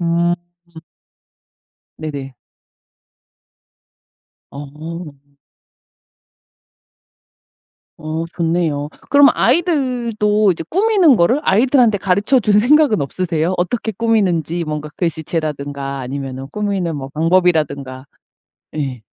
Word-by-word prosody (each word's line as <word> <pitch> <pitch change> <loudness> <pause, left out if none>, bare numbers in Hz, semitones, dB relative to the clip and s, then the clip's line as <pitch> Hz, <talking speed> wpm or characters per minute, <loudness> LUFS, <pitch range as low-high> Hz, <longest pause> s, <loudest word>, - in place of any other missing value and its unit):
음. 170 0 +1 1.6
네네. 140 -4 -6 2.2
어. 150 +3 -8 2.9
어 155 +2 -4
좋네요. 165 -4 -1 0.2
그럼 285 0 +7
아이들도 240 - +1
이제 165 - -5
꾸미는 385 - +4
거를 225 +9 +3
아이들한테 240 -1 +3
가르쳐 200 +8 +2
줄 210 -2 +3
생각은 270 - +4
없으세요? 170 +3 -1
어떻게 220 +5 -1
꾸미는지 180 -7 0
뭔가 150 0 -4
글씨체라든가 150 -4 -3
아니면은 135 0 -6
꾸미는 195 -6 -2
뭐 135 -2 -6
방법이라든가. 150 -5 0 0.7
예. 130 -6 -4
170 Hz, 210 characters per minute, -18 LUFS, 150-215 Hz, 2.9 s, 그럼